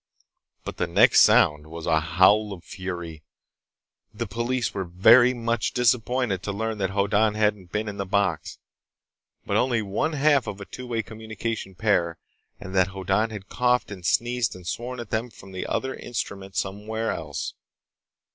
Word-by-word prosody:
But - - -7
the - - 0
next - - +6
sound 75 0 +4
was 80 0 -8
a 80 - +3
howl 95 +6 +3
of 90 -3 -11
fury. 85 -5 -6 0.9
The 110 +2 -4
police 120 +4 -2
were 95 - -2
very 110 +8 +6
much 115 -2 -1
disappointed 125 -4 +1
to 100 - -3
learn 110 +1 -3
that 95 -1 0
Hoddan 105 +2 +2
hadn't 105 -4 0
been 105 +1 -2
in 105 -1 -5
the 100 - -2
box, 100 +1 0 0.9
but - - 0
only 120 -3 +1
one 105 +11 -1
half 145 -2 +3
of 100 - -5
a 100 - -7
two 125 +5 -9
way 115 -2 -1
communication 110 -2 -5
pair, 90 -4 +1 0.4
and 95 - -8
that 95 -1 +3
Hoddan 95 +3 0
had 105 -3 -8
coughed 125 -2 +1
and 95 -3 -8
sneezed 120 +2 +1
and 90 -1 -12
sworn 120 +8 -4
at 120 -3 -8
them 115 +3 -1
from 95 -3 -14
the 95 - -5
other 130 0 -2
instrument 100 -5 -6
somewhere 110 +3 -2
else. 75 -4 -5
105 Hz, 165 wpm, -25 LUFS, 95-115 Hz, 0.9 s, next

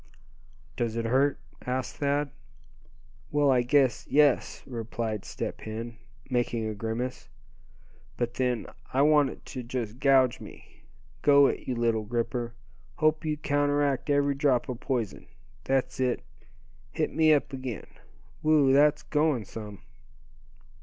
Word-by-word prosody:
"Does 115 -2 -2
it 115 0 -2
hurt?" 135 +4 +2 0.3
asked 130 0 -3
Thad. 145 0 0 1.0
"Well, 145 -1 +3
I 125 -2 +4
guess, 130 0 +2
yes," 145 -3 +3
replied 115 -3 -4
Step - - -5
Hen, 115 +2 -6 0.3
making 120 -3 -1
a 110 - -2
grimace; 115 +4 -4 0.9
"but 120 -1 -1
then, 125 -2 -1 0.3
I 135 +2 +3
want 150 -2 +5
it - - -11
to 130 - -6
just 120 -1 -5
gouge 135 -3 +4
me. - - -14 0.4
Go 140 -1 +6
it, - - -1
you 125 - -1
little 115 -2 +1
gripper; 120 +1 -2 0.4
hope 155 +1 +2
you 155 -1 -1
counteract 145 -1 +1
every 145 0 +3
drop 135 -3 +1
of 125 -2 -4
poison. 120 -7 -3 0.4
That's 130 -1 0
it, 125 -1 0 0.7
hit - - -1
me 160 0 +4
up 145 -2 +2
again. 130 -4 -5 0.6
Whew! 150 -3 +4
that's 145 +2 +4
going 150 -7 +1
some." 105 -1 -9
130 Hz, 135 wpm, -28 LUFS, 120-145 Hz, 1.0 s, Go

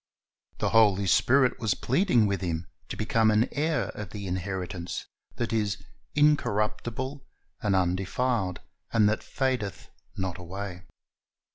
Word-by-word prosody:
The - - 0
Holy 105 -3 +5
Spirit 130 +7 +4
was 110 -5 +1
pleading 130 - +3
with 100 -1 0
him 85 -2 -2 0.2
to - - -5
become 110 0 +3
an 110 +2 +3
heir 155 +2 0
of 105 -3 -6
the 100 0 -6
inheritance 90 -1 -4 0.3
that 120 -1 -2
is 105 -3 +1 0.4
"incorruptible, 130 -1 +1 0.4
and 100 -2 +2
undefiled, 95 +2 0 0.3
and 110 -2 +4
that 105 - +1
fadeth 130 -8 -2 0.3
not 95 -2 -3
away." 90 0 -6
105 Hz, 125 wpm, -28 LUFS, 95-120 Hz, 0.4 s, Holy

